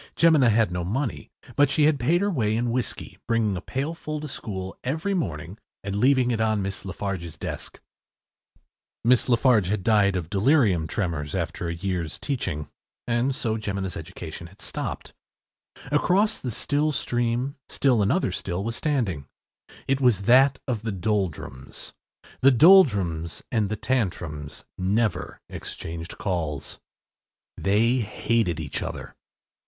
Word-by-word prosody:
Jemina 155 Hz, -7 st, +5 dB
had 110 Hz, -3 st, +3 dB
no 90 Hz, -1 st, -2 dB
money, 120 Hz, +8 st, -2 dB, 0.3 s
but 145 Hz, -1 st, +5 dB
she 150 Hz, -, +2 dB
had 150 Hz, -2 st, +4 dB
paid 165 Hz, +9 st, +2 dB
her 200 Hz, 0 st, +1 dB
way 110 Hz, -, +1 dB
in 120 Hz, 0 st, 0 dB
whiskey, 125 Hz, -2 st, -3 dB
bringing 115 Hz, -4 st, +1 dB
a 90 Hz, -, -4 dB
pailful 155 Hz, -, -4 dB
to 150 Hz, -, -5 dB
school 95 Hz, -8 st, -6 dB
every 160 Hz, +10 st, -1 dB
morning 85 Hz, -, -3 dB, 0.2 s
and 100 Hz, 0 st, -3 dB
leaving 125 Hz, +3 st, +3 dB
it 110 Hz, -2 st, 0 dB
on 110 Hz, -2 st, +1 dB
Miss 100 Hz, 0 st, -4 dB
Lafarge’s 95 Hz, -4 st, -4 dB
desk. -, -, -6 dB, 1.2 s
Miss 125 Hz, +2 st, +4 dB
Lafarge 120 Hz, -5 st, +4 dB
had 105 Hz, -1 st, -1 dB
died 100 Hz, -3 st, +4 dB
of 90 Hz, -3 st, -2 dB
delirium 100 Hz, -, +3 dB
tremens 80 Hz, -7 st, -2 dB
after 85 Hz, 0 st, -2 dB
a 85 Hz, -, -2 dB
year’s 85 Hz, -3 st, -3 dB
teaching, 90 Hz, -, -3 dB, 0.4 s
and 120 Hz, +3 st, +1 dB
so 110 Hz, -4 st, -1 dB
Jemina’s 100 Hz, -3 st, -3 dB
education 85 Hz, 0 st, -7 dB
had 100 Hz, +3 st, -19 dB
stopped. -, -, -5 dB, 0.8 s
Across 190 Hz, +8 st, +3 dB
the 125 Hz, -, -4 dB
still 145 Hz, +6 st, 0 dB
stream, 120 Hz, +1 st, -1 dB
still 130 Hz, -5 st, +2 dB
another 125 Hz, -, +2 dB
still 90 Hz, +1 st, -3 dB
was 115 Hz, +2 st, -3 dB
standing. 110 Hz, -, -1 dB, 0.6 s
It 135 Hz, 0 st, +1 dB
was 115 Hz, -7 st, +3 dB
that 130 Hz, +4 st, +5 dB
of 120 Hz, -5 st, -1 dB
the 110 Hz, -1 st, -3 dB
Doldrums. 95 Hz, -9 st, -3 dB, 0.5 s
The 135 Hz, -, +6 dB
Doldrums 100 Hz, -, +5 dB
and 110 Hz, -4 st, +1 dB
the 110 Hz, -, -1 dB
Tantrums 85 Hz, -, -2 dB
never 100 Hz, 0 st, 0 dB
exchanged 85 Hz, +1 st, -7 dB
calls. 80 Hz, -7 st, -3 dB, 0.8 s
They 110 Hz, +6 st, +2 dB
hated 110 Hz, -4 st, 0 dB
each -, -, -4 dB
other. -, -, -6 dB
110 Hz, 140 wpm, -25 LUFS, 90-130 Hz, 1.2 s, The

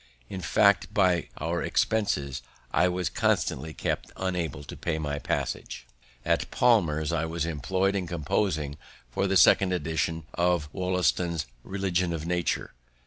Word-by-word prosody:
In 95 Hz, -, -5 dB
fact, 100 Hz, +3 st, +3 dB
by 90 Hz, -4 st, +3 dB
our 85 Hz, +3 st, -1 dB
expenses, 70 Hz, -12 st, 0 dB, 0.3 s
I 90 Hz, -, +4 dB
was 90 Hz, 0 st, -1 dB
constantly 80 Hz, -, 0 dB
kept -, -, -3 dB
unable 85 Hz, -7 st, -2 dB
to -, -, -8 dB
pay 80 Hz, -2 st, -2 dB
my 75 Hz, -2 st, -2 dB
passage. -, -, -3 dB, 0.4 s
At -, -, +1 dB
Palmer's 80 Hz, -10 st, +3 dB
I 80 Hz, -1 st, 0 dB
was 80 Hz, 0 st, -2 dB
employed 95 Hz, +6 st, 0 dB
in 95 Hz, -3 st, -1 dB
composing 80 Hz, -2 st, -1 dB, 0.3 s
for 100 Hz, +10 st, 0 dB
the 95 Hz, 0 st, +3 dB
second 95 Hz, 0 st, +6 dB
edition 80 Hz, -1 st, -1 dB
of 85 Hz, -4 st, +1 dB
Wollaston's 90 Hz, -3 st, 0 dB, 0.2 s
"Religion 95 Hz, -3 st, -1 dB
of 80 Hz, -1 st, -4 dB
Nature." 90 Hz, 0 st, -1 dB
85 Hz, 140 wpm, -27 LUFS, 80-95 Hz, 0.4 s, second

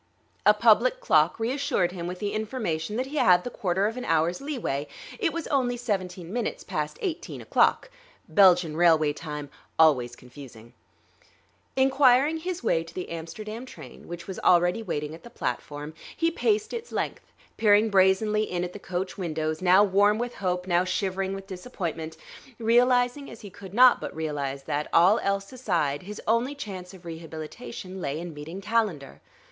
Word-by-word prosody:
A -, -, +8 dB
public -, -, +4 dB
clock -, -, +3 dB
reassured 245 Hz, -6 st, 0 dB
him 175 Hz, -2 st, -5 dB
with 180 Hz, +1 st, -5 dB
the 205 Hz, +1 st, -3 dB
information 215 Hz, -6 st, -3 dB
that 255 Hz, +3 st, -1 dB
he 290 Hz, +3 st, -6 dB
had 180 Hz, -8 st, +5 dB
the 245 Hz, -, -5 dB
quarter 190 Hz, -1 st, 0 dB
of 225 Hz, +3 st, -2 dB
an 250 Hz, -, -5 dB
hour's 165 Hz, +4 st, +1 dB
leeway; 235 Hz, -, -3 dB, 0.3 s
it -, -, +1 dB
was 335 Hz, -2 st, -4 dB
only 250 Hz, -3 st, +1 dB
seventeen 185 Hz, -6 st, -3 dB
minutes 240 Hz, -2 st, -2 dB
past 150 Hz, 0 st, -3 dB
eighteen 350 Hz, -5 st, -4 dB
o'clock -, -, +2 dB, 0.4 s
(Belgian 180 Hz, -5 st, +5 dB
railway 160 Hz, -3 st, +4 dB
time, 150 Hz, -2 st, -7 dB, 0.3 s
always 130 Hz, -7 st, +4 dB
confusing). 125 Hz, -3 st, -13 dB, 1.0 s
Inquiring 270 Hz, +2 st, +4 dB
his 360 Hz, +2 st, -5 dB
way 165 Hz, -, +2 dB
to 165 Hz, -, -12 dB
the 180 Hz, -, -5 dB
Amsterdam 215 Hz, +8 st, -6 dB
train, 155 Hz, -, -12 dB
which 175 Hz, 0 st, -7 dB
was 190 Hz, -, -6 dB
already 175 Hz, +4 st, +3 dB
waiting 150 Hz, -8 st, -4 dB
at 165 Hz, -, -11 dB
the 235 Hz, -, -12 dB
platform, 150 Hz, -9 st, -5 dB, 0.2 s
he 330 Hz, 0 st, +2 dB
paced 425 Hz, +5 st, 0 dB
its 470 Hz, 0 st, -6 dB
length, -, -, -4 dB, 0.3 s
peering 210 Hz, 0 st, +4 dB
brazenly 195 Hz, +3 st, +3 dB
in 175 Hz, -1 st, -2 dB
at 180 Hz, 0 st, -5 dB
the 205 Hz, -, -8 dB
coach 185 Hz, +1 st, -4 dB
windows, 155 Hz, -2 st, -2 dB
now 185 Hz, +2 st, +6 dB
warm 205 Hz, +1 st, +3 dB
with 240 Hz, +1 st, -3 dB
hope, 180 Hz, -2 st, -2 dB
now 175 Hz, -1 st, +2 dB
shivering 190 Hz, +1 st, -2 dB
with 195 Hz, 0 st, -8 dB
disappointment, 175 Hz, -5 st, -5 dB, 0.4 s
realizing 245 Hz, +3 st, +2 dB
as -, -, -11 dB
he 205 Hz, -, -10 dB
could 190 Hz, +1 st, -11 dB
not 250 Hz, +1 st, +7 dB
but -, -, -6 dB
realize 145 Hz, -3 st, -3 dB
that, 145 Hz, +2 st, -2 dB
all 180 Hz, +6 st, +5 dB
else 195 Hz, +3 st, -2 dB
aside, 170 Hz, -, -1 dB
his 205 Hz, +3 st, -8 dB
only 235 Hz, +6 st, +1 dB
chance 190 Hz, -9 st, -7 dB
of 180 Hz, -1 st, -16 dB
rehabilitation 170 Hz, +4 st, -8 dB
lay 140 Hz, 0 st, -3 dB
in 170 Hz, -1 st, -6 dB
meeting 160 Hz, +6 st, -8 dB
Calendar. 205 Hz, -10 st, -1 dB
190 Hz, 170 wpm, -26 LUFS, 165-235 Hz, 1.0 s, A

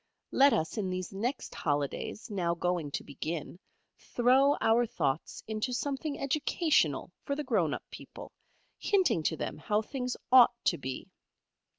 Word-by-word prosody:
Let 280 Hz, +1 st, +6 dB
us 160 Hz, +4 st, -1 dB
in 190 Hz, -3 st, -1 dB
these 185 Hz, 0 st, -4 dB
next 240 Hz, +7 st, -3 dB
Holidays, 145 Hz, -, -2 dB
now 175 Hz, -4 st, 0 dB
going 175 Hz, -3 st, -1 dB
to -, -, -4 dB
begin, 155 Hz, +4 st, -5 dB, 0.4 s
throw 265 Hz, +4 st, +3 dB
our 230 Hz, +2 st, +4 dB
thoughts 150 Hz, -6 st, -2 dB
into 220 Hz, +3 st, -2 dB
something 280 Hz, +3 st, -3 dB
educational 280 Hz, -, +1 dB
for 280 Hz, -, -3 dB
the 300 Hz, -, -3 dB
grown 205 Hz, -, +1 dB
up -, -, -4 dB
people, -, -, -10 dB, 0.5 s
hinting 375 Hz, -, +2 dB
to 160 Hz, +1 st, -1 dB
them -, -, -4 dB
how 210 Hz, +7 st, 0 dB
things 250 Hz, +1 st, -4 dB
ought 245 Hz, -2 st, +8 dB
to 170 Hz, -, +2 dB
be. 130 Hz, -1 st, -6 dB
215 Hz, 150 wpm, -30 LUFS, 165-265 Hz, 0.5 s, ought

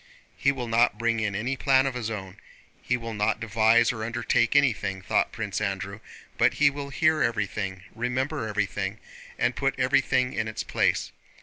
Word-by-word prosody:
"He 140 Hz, -, +2 dB
will 125 Hz, -3 st, -5 dB
not 115 Hz, -2 st, +3 dB
bring 115 Hz, 0 st, 0 dB
in 105 Hz, -2 st, -1 dB
any 120 Hz, +7 st, -1 dB
plan 135 Hz, -1 st, +3 dB
of 135 Hz, -, -1 dB
his 120 Hz, -3 st, -3 dB
own. 95 Hz, -3 st, -6 dB, 0.4 s
He 125 Hz, -, 0 dB
will 115 Hz, -1 st, -6 dB
not 105 Hz, 0 st, 0 dB
devise 115 Hz, +1 st, +3 dB
or 110 Hz, -3 st, -5 dB
undertake 120 Hz, +2 st, +1 dB
anything," 110 Hz, -9 st, +2 dB
thought -, -, +1 dB
Prince 105 Hz, -3 st, -4 dB
Andrew, 100 Hz, 0 st, -3 dB, 0.4 s
"but -, -, +4 dB
he 140 Hz, -1 st, +4 dB
will 140 Hz, 0 st, -6 dB
hear 155 Hz, +1 st, +2 dB
everything, 100 Hz, -5 st, -2 dB
remember 125 Hz, +3 st, -2 dB
everything, 105 Hz, -1 st, -2 dB, 0.4 s
and 125 Hz, -, +1 dB
put 135 Hz, -1 st, -1 dB
everything 130 Hz, 0 st, +2 dB
in 110 Hz, -1 st, -2 dB
its 110 Hz, -, -4 dB
place. -, -, 0 dB
115 Hz, 175 wpm, -26 LUFS, 105-130 Hz, 0.4 s, but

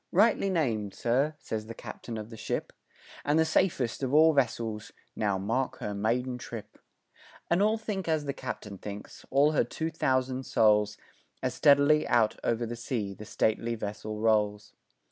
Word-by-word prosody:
rightly 200 Hz, +1 st, +4 dB
named, 115 Hz, -, 0 dB
sir" 135 Hz, +6 st, +1 dB
says 110 Hz, -6 st, -5 dB
the 115 Hz, -, -7 dB
captain 115 Hz, 0 st, -7 dB
of 110 Hz, +2 st, -7 dB
the -, -, -8 dB
ship, -, -, -3 dB, 0.5 s
"And 145 Hz, +2 st, +2 dB
the 160 Hz, -, +4 dB
safest 155 Hz, -8 st, +1 dB
of 135 Hz, +1 st, 0 dB
all 160 Hz, +1 st, +7 dB
vessels 115 Hz, -5 st, -1 dB, 0.2 s
now 100 Hz, -3 st, 0 dB
mark 125 Hz, +7 st, -1 dB
her 105 Hz, -, -4 dB
maiden 125 Hz, +5 st, -1 dB
trip," 115 Hz, -3 st, -8 dB, 0.7 s
And 175 Hz, +3 st, +4 dB
all 215 Hz, +2 st, +3 dB
think 210 Hz, -4 st, -4 dB
as 155 Hz, -2 st, +1 dB
the 140 Hz, -, -2 dB
captain 105 Hz, -4 st, -6 dB
thinks 105 Hz, 0 st, -9 dB
all 140 Hz, +3 st, +4 dB
her 155 Hz, -, +3 dB
two 160 Hz, +7 st, -4 dB
thousand 130 Hz, -4 st, 0 dB
souls 105 Hz, -1 st, +3 dB, 0.5 s
As -, -, 0 dB
steadily 145 Hz, +2 st, +5 dB
out 115 Hz, -3 st, +3 dB
o'er 120 Hz, 0 st, 0 dB
the 120 Hz, +1 st, -5 dB
sea 115 Hz, -4 st, -3 dB
the 105 Hz, -, -10 dB
stately 115 Hz, +2 st, 0 dB
vessel 105 Hz, 0 st, -5 dB
rolls. 105 Hz, -1 st, +1 dB
120 Hz, 165 wpm, -29 LUFS, 110-145 Hz, 0.7 s, all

